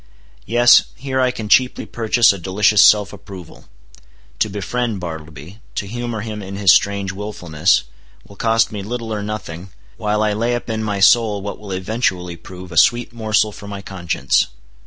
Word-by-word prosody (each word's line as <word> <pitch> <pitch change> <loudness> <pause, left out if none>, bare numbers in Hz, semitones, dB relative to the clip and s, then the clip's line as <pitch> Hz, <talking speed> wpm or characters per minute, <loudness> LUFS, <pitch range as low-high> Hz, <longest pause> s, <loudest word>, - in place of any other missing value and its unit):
Yes. 120 +1 +6
Here 130 0 -2
I 130 - +3
can 110 -4 -5
cheaply 125 +4 +3
purchase 115 -1 +3
a 100 - -7
delicious 100 +3 +3
self 105 -2 +5
approval. 90 -5 -12 0.7
To 110 - +1
befriend 105 +2 -3
Bartleby; 80 +2 -9 0.2
to - - -2
humor 120 +1 -5
him 105 -1 -6
in 95 0 -7
his 100 -2 +5
strange 100 0 +1
willfulness, 90 -7 0 0.4
will 100 - -15
cost 115 +2 +1
me 105 -2 -5
little 115 +2 -5
or 105 - -3
nothing, 100 -4 -6 0.3
while 105 0 0
I 105 -1 +1
lay 115 +3 0
up 120 -1 -5
in 110 0 -2
my 105 -2 -2
soul 105 -1 +4
what 100 - -6
will 105 -2 -9
eventually 95 -2 -2
prove 90 +1 -11
a 85 - -6
sweet 120 +9 +3
morsel 110 -2 +1
for 100 - -11
my 100 -1 -7
conscience. 90 -3 0
105 Hz, 175 wpm, -19 LUFS, 95-115 Hz, 0.7 s, Yes